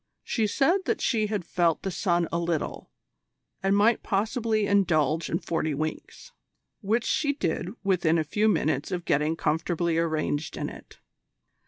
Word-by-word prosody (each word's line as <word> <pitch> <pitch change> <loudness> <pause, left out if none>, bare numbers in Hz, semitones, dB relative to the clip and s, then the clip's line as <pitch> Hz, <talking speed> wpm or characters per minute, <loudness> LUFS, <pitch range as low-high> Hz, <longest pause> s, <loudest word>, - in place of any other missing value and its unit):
She 220 -3 0
said 340 - +2
that - - 0
she 215 -3 +1
had 205 -4 -3
felt 170 -2 +1
the 190 - -2
sun 175 -2 +1
a 170 - 0
little, 170 -2 -3 0.7
and 195 +1 +2
might 220 +3 +4
possibly 220 +1 0
indulge 165 -6 +2
in 165 - +1
forty 160 -3 -2
winks 155 - -5 0.5
which 220 +3 0
she 285 -2 +1
did 175 - -2
within 180 -4 +2
a 160 - +1
few 205 +8 +1
minutes 155 -6 0
of 175 -1 -3
getting 150 +3 +1
comfortably 165 +1 0
arranged 155 -2 -1
in - - -3
it. - - -13
175 Hz, 155 wpm, -27 LUFS, 160-210 Hz, 0.7 s, might